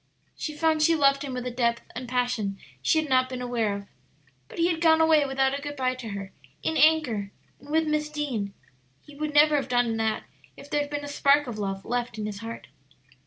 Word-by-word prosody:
She 305 - -5
found 315 0 +2
she 330 +2 +5
loved 275 -2 +3
him 275 -3 -4
with 250 0 -4
a 250 - -2
depth 235 -1 0
and 250 +1 -6
passion 245 -5 -1 0.2
she 315 - +3
had 315 - -2
not 255 -1 +3
been 255 -1 -5
aware 235 -4 -1
of. 200 0 -7 0.6
But - - -12
he 335 - +3
had 325 -1 -3
gone 320 -1 +5
away 315 -3 +4
without 270 0 +1
a 280 - -3
good 290 0 -5
by 255 -2 0
to 250 -3 -7
her, 200 -1 -6 0.3
in 320 - 0
anger, 290 -11 +3 0.3
and 285 - -16
with 320 +1 +2
Miss 305 0 0
Deane. 255 -10 -3 0.5
He 295 - -15
would 300 0 -4
never 300 0 +6
have 275 - -2
done 245 -2 +1
that 220 -1 0 0.3
if 280 +1 -13
there 295 - +2
had 290 - -4
been 290 0 -4
a - - -6
spark 285 0 +3
of 235 -4 -6
love 195 -1 -3
left 245 -2 -2
in 215 - -3
his 205 -1 -5
heart. 230 +1 -7
265 Hz, 230 wpm, -26 LUFS, 230-300 Hz, 0.6 s, never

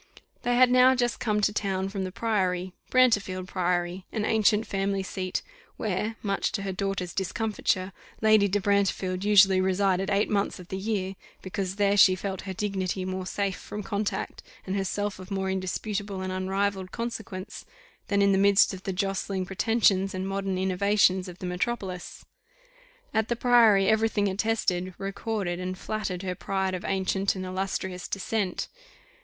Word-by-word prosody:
They 245 0 +1
had 250 0 +6
now 255 +1 +6
just 245 -1 0
come 210 -2 0
to 210 0 +2
town 195 -2 -1
from 195 -1 -3
the 185 - -5
Priory 185 -4 -1 0.2
Brantefield 205 -8 +3
Priory, 180 0 -1
an 215 -2 -1
ancient 220 0 +3
family 195 0 -1
seat, 185 -1 -3 0.3
where, 210 +2 -2
much 200 -2 0
to 200 - -2
her 195 - -2
daughter's 190 -2 -3
discomfiture, 195 -1 -1 0.3
Lady 215 -2 +5
de 205 +1 +1
Brantefield 195 -2 0
usually 195 -2 +6
resided 190 0 +1
eight 200 +2 +2
months 200 -1 0
of 180 -2 -12
the 190 - -3
year, 195 -2 -2 0.3
because 190 0 -3
there 200 0 +2
she 190 -2 +7
felt 190 0 -4
her - - -2
dignity 190 -1 -2
more 185 0 -4
safe 200 -1 -1
from 210 0 -7
contact, 205 0 -3 0.2
and 190 - -2
herself 200 +1 -2
of 185 +1 -10
more 190 -1 -1
indisputable 195 +1 -3
and 185 0 -3
unrivalled 190 0 -1
consequence, 220 -4 -5 0.4
than 200 0 +2
in 200 - +4
the 190 - +3
midst 200 0 +5
of 185 - -7
the 190 - -3
jostling 195 0 -1
pretensions 195 -1 +2
and 185 +1 -3
modern 195 -1 -2
innovations 190 0 +2
of 180 -1 -9
the 185 - -7
metropolis. 180 0 -4 0.9
At 220 0 +1
the 240 - 0
Priory 230 -5 +5
every 220 +1 +3
thing 205 -2 +1
attested, 190 -3 -1
recorded, 195 -2 -3
and 185 0 -4
flattered 195 -3 -3
her 185 -1 -2
pride 190 +1 -2
of 185 +1 -4
ancient 195 0 0
and 185 -1 -4
illustrious 185 -1 -3
descent. 195 -1 -2
195 Hz, 165 wpm, -27 LUFS, 185-205 Hz, 0.9 s, she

